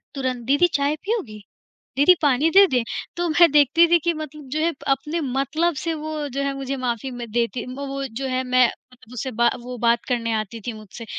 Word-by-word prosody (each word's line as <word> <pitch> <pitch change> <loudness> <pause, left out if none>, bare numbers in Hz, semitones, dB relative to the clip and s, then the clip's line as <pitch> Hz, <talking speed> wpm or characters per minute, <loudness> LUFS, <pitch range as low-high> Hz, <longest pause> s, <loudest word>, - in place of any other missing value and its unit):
तुरंत, 255 -3 -3
"दीदी 285 +7 +4
चाय 285 +1 +1
पीओगी, 330 - -3 0.6
दीदी 290 +6 +7
पानी 290 +1 +3
दे 395 +2 +8
दें?" 250 -2 +2 0.4
तो 350 0 0
मैं 335 +1 +5
देखती 295 +4 +5
थी 345 - +7
कि 340 +2 0
मतलब 305 -2 -8
जो 305 +4 -2
है 330 +2 +2 0.2
अपने 295 +5 -1
मतलब 290 +5 -1
से 330 -1 -1
वो 310 -1 -4
जो 275 +2 -3
है 280 0 -1
मुझे 275 0 -4
माफ़ी 250 0 -3
म 245 -1 -6
देती 240 +1 -1
वो 280 +1 -5
वो 275 0 -4 0.2
जो 270 - -2
है 255 0 -1
मैं 250 -1 +4 0.4
उसे 255 +2 -4
बा 235 +1 +2
वो 250 +1 -7
बात 235 0 +2
करने 235 -2 -1
आती 220 +1 -3
थी 240 - -2
मुझसे 215 +1 -11
275 Hz, 210 wpm, -22 LUFS, 245-310 Hz, 0.6 s, दे